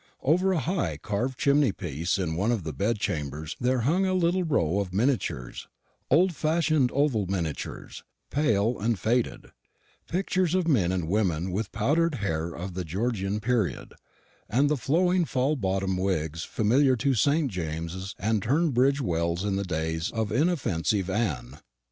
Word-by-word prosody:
Over 180 +7 +3
a 185 - +1
high 140 - -1
carved 120 - -2
chimney 140 -3 +3
piece 85 0 -2
in 85 -4 -2
one 100 +7 +1
of 115 -7 -1
the 80 -1 -4
bedchambers 80 - -2
there 125 0 +1
hung 165 +11 +2
a 185 -1 +1
little 180 +1 +2
row 100 - +1
of 100 -3 -3
miniatures 110 - -1 0.4
old 175 +6 +4
fashioned 155 -3 +2
oval 130 -8 +1
miniatures, 85 -5 -4 0.3
pale 115 -5 +1
and 110 +1 0
faded 115 +4 -1 0.6
pictures 185 -1 0
of 185 -3 +1
men 105 - +3
and 90 -4 -2
women 90 -3 0
with 105 +5 -2
the - - -11
powdered 155 +8 +2
hair 85 -8 -2
of 90 +2 -6
the 90 +1 -3
Georgian 100 +3 -2
period, 110 - -1 0.6
and 135 +6 +3
the - - +3
flowing 175 +7 +2
full 140 -1 0
bottomed 95 -5 -1
wigs 85 -4 -1
familiar 130 +5 +2
to 135 +3 +1
St. 140 +4 +2
James's 85 +2 -4
and 110 0 0
Tunbridge 140 - +2
wells 85 -2 -1
in 100 -1 0
the 100 - -1
days 80 -2 -2
of 110 -2 -2
inoffensive 105 - 0
Anne. 85 - -2
110 Hz, 155 wpm, -27 LUFS, 90-140 Hz, 0.6 s, old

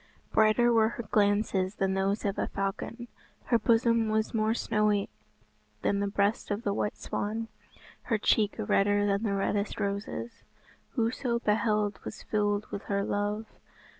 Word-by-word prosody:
Brighter 220 +2 +4
were 220 -1 +4
her 235 0 -6
glances 205 -2 +2
than 195 -1 0
those 195 +2 0
of 200 -1 -1
a - - 0
falcon; 195 +5 -4 0.4
her 235 -2 +3
bosom 230 0 +3
was 215 0 0
more 220 0 +1
snowy 210 -3 +1 0.7
than 200 - +1
the 200 - 0
breast 200 +1 0
of 205 +2 -2
the 200 - 0
white 210 +1 -2
swan, 225 +2 -3 0.6
her 225 - +1
cheek 210 0 +2
redder 205 -1 +2
than 200 0 +1
the 210 -3 0
reddest 200 +1 -1
roses. 200 +3 -4 0.5
Whoso 235 0 0
beheld 210 -2 +1
was - - -8
filled 205 -1 0
with 200 - -5
her 200 -1 0
love. 205 +2 -1
210 Hz, 150 wpm, -29 LUFS, 200-225 Hz, 0.7 s, Brighter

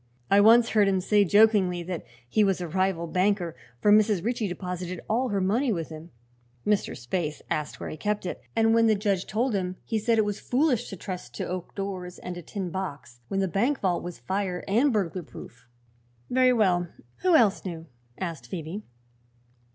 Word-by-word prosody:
I 200 +1 +7
once 230 +2 +6
heard 210 -2 +4
him 190 -1 +2
say, 205 +2 +3
jokingly, 200 -3 +4
that 175 -1 -5 0.2
he 210 - +3
was 195 -2 +2
a 175 - -4
rival 185 0 0
banker, 180 -1 0 0.3
for 205 - +4
Mrs. 210 -3 +4
Ritchie 235 -2 0
deposited 180 -1 -5
all 245 +4 +1
her 200 -2 0
money 225 +8 +1
with 165 -6 -3
him. 160 +1 -9 0.6
Mr. 210 -1 +1
Spaythe 150 +5 -3
asked 150 -1 -2
where - - -5
he - - -7
kept 210 +1 -2
it, 180 - -4
and 225 0 +4
when 230 0 +5
the 215 - +4
judge 200 -2 0
told 240 +3 0
him 185 -2 -1
he 225 - -1
said 225 +2 +2
it 220 - +3
was 205 0 -3
foolish 255 -2 +1
to - - -6
trust 180 -9 -7
to - - -3
oak 180 -1 -5
doors 185 -3 -5
and 180 - -6
a 175 - -7
tin 185 +1 -5
box 145 -10 -6
when 195 +7 -1
the 190 - +1
bank 235 - +1
vault 180 -3 +1
was 175 -1 -7
fire 190 -2 -2
and 240 +8 +3
burglar 190 -5 -1
proof." 150 - -12 0.6
"Very 255 0 +5
well; 185 -7 +2 0.3
who 365 -3 +3
else 215 -8 +4
knew?" 165 -3 -6 0.3
asked 165 -9 -5
Phoebe. 170 - -5
195 Hz, 195 wpm, -27 LUFS, 175-215 Hz, 0.6 s, I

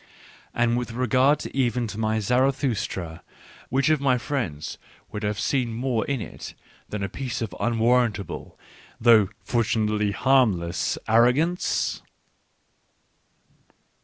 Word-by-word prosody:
And 120 0 +2
with 120 -1 -5
regard 130 +4 +2
even 125 -3 +1
to 105 -1 -6
my 110 0 +1
Zaratkustra, 120 - 0 0.5
which 135 +4 +2
of 155 -3 +2
my 130 -3 +3
friends 115 - -4 0.3
would 105 - -5
have 105 0 -2
seen 120 -1 0
more 120 -1 -1
in 140 -2 -1
it - - -8 0.3
than 105 -1 -4
a - - -1
piece 125 +4 -4
of 110 -6 -4
unwarrantable, 115 -5 0 0.4
though 110 -4 +5
fortunately 110 -3 +1
harmless, 100 -7 +2
ar 115 +2 +6
rogance 165 +8 0
120 Hz, 115 wpm, -25 LUFS, 105-130 Hz, 0.5 s, ar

